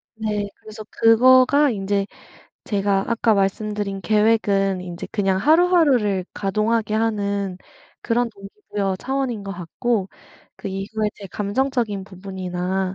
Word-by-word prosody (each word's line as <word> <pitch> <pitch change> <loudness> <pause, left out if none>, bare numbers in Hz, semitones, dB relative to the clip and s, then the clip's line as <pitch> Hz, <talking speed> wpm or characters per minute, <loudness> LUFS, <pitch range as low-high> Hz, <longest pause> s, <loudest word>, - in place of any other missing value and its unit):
네. 210 -2 -2
그래서 215 0 -11
그거가 255 +5 +5
인제 200 -1 -1 0.6
제가 195 -1 0
아까 230 -1 +2
말씀드린 200 0 -1
계획은 200 -2 +2
인제 175 -1 -7
그냥 195 -3 +1
하루하루를 290 - +3
가동하게 215 +2 0
하는 200 -4 -1 0.4
그런 235 +1 0
동기부여 200 - -4
차원인 260 -1 -2
것 200 - -6
같고 195 +3 -2 0.5
그 - - -6
이후에 200 +3 -2
제 200 - -9
감정적인 210 0 -1
부분이나 185 -1 -4
205 Hz, 280 characters per minute, -22 LUFS, 195-225 Hz, 0.6 s, 그거가